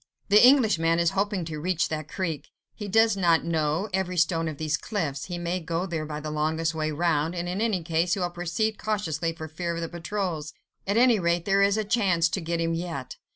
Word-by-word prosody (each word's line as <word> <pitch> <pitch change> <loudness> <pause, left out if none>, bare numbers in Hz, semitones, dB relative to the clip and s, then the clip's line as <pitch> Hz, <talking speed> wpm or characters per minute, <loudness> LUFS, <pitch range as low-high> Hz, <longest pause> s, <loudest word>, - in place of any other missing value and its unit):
"The 210 +3 +7
Englishman 215 - +5
is 170 -1 +2
hoping 200 -2 -1
to 155 -1 -5
reach 175 +1 0
that 155 -1 -4
creek. 160 -6 -4 0.2
He 210 - -7
does 220 +1 +4
not 170 -4 +3
know 160 +3 0
every 185 -1 -1
stone 165 -1 +2
of 155 -2 -5
these 155 0 0
cliffs, 155 -8 -3
he 175 -1 -5
may 175 +1 -2
go 170 +1 -2
there 160 -4 -4
by 150 -1 -5
the 155 0 -5
longest 160 +2 0
way 155 -1 -1
round, 160 +1 0
and 175 0 -3
in 185 +4 -2
any 210 -7 0
case 170 +2 +1
he - - -4
will 175 -1 -1
proceed 175 +5 -2
cautiously 170 -7 -1
for 160 -1 -7
fear 170 +2 -4
of 170 - -4
the 165 - -2
patrols. 170 -3 -4 0.3
At 200 +3 +1
any 240 -3 +5
rate, 170 -1 0
there 195 0 +3
is 200 +1 +3
a 215 - +1
chance 190 -7 +2
to 190 - -2
get 170 +1 -2
him 165 0 0
yet. 165 -6 -5
170 Hz, 225 wpm, -26 LUFS, 160-195 Hz, 0.3 s, The